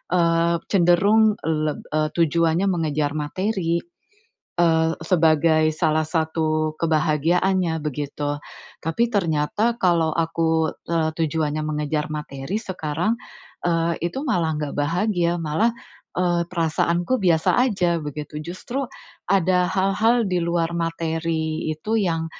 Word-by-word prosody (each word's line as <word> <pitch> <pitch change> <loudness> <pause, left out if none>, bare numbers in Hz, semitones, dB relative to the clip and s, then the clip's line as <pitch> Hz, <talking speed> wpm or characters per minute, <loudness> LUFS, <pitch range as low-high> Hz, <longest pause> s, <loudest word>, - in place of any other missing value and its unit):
eee, 170 0 +3
cenderung 200 +4 +4
leb 155 -1 -1
eee, 155 0 +1
tujuannya 170 +2 +2
mengejar 155 -4 0
materi, 170 +3 -1 0.7
eee, 160 -1 +3
sebagai 160 -2 +3
salah 155 -1 +1
satu 155 -1 0
kebahagiaannya, 165 +3 +1
begitu. 145 0 -3 0.4
Tapi 165 +8 0
ternyata 195 +5 +1
kalau 170 -5 +2
aku, 160 -1 +1 0.2
eee, 165 -2 +1
tujuannya 155 -1 -1
mengejar 150 0 -2
materi 150 +3 -4
sekarang, 175 -1 -2 0.5
eee, 170 -1 +1 0.2
itu 265 +10 -5
malah 165 - 0
enggak 150 -2 -3
bahagia, 175 +3 +1
malah 165 +7 +1 0.5
eee, 175 -1 +2
perasaanku 170 +6 0
biasa 170 -4 +3
saja 185 -9 +1
begitu. 150 0 -6
Justru 185 - -4 0.4
ada 185 -1 +3
hal-hal 210 +6 +2
di 180 -1 +1
luar 170 0 0
materi 165 -1 -2
itu 155 +8 -4
yang, 165 -5 0
165 Hz, 110 wpm, -23 LUFS, 155-180 Hz, 0.7 s, cenderung